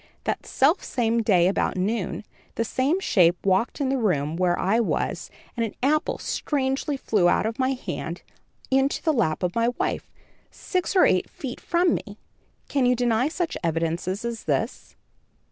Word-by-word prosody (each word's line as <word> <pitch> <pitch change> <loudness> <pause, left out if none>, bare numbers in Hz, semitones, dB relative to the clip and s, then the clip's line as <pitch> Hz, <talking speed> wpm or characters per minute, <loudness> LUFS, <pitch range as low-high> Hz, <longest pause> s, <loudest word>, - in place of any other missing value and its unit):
That - - -3
selfsame 245 - +1
day, 185 -6 +4
about 190 - 0
noon, 195 -1 -1 0.3
the 230 - 0
same 275 - +1
shape 175 - +3
walked 195 +8 +1
in 275 -2 0
the 270 0 +1
room 155 -8 0
where 180 0 +1
I 200 +5 +2
was, 230 - -1 0.3
and 235 - 0
an 225 - -4
apple 300 +3 +1
strangely 275 0 -1
flew 200 -8 +2
out 190 - +2
of 225 +2 -3
my 260 +1 +2
hand, 260 - -5 0.5
into 270 +1 +2
the 315 - +2
lap 160 - 0
of 180 0 0
my 230 0 +1
wife, - - -2 0.4
six 365 +1 -3
or 370 - +6
eight 185 - +2
feet 255 -3 -7
from 345 0 +2
me. 205 -1 -5 0.5
Can 270 -3 +1
you 250 - +4
deny 240 +1 +2
such 335 +1 -2
evidences 170 +5 -1
as 235 -1 -4
this?" - - -2
230 Hz, 165 wpm, -25 LUFS, 185-270 Hz, 0.5 s, or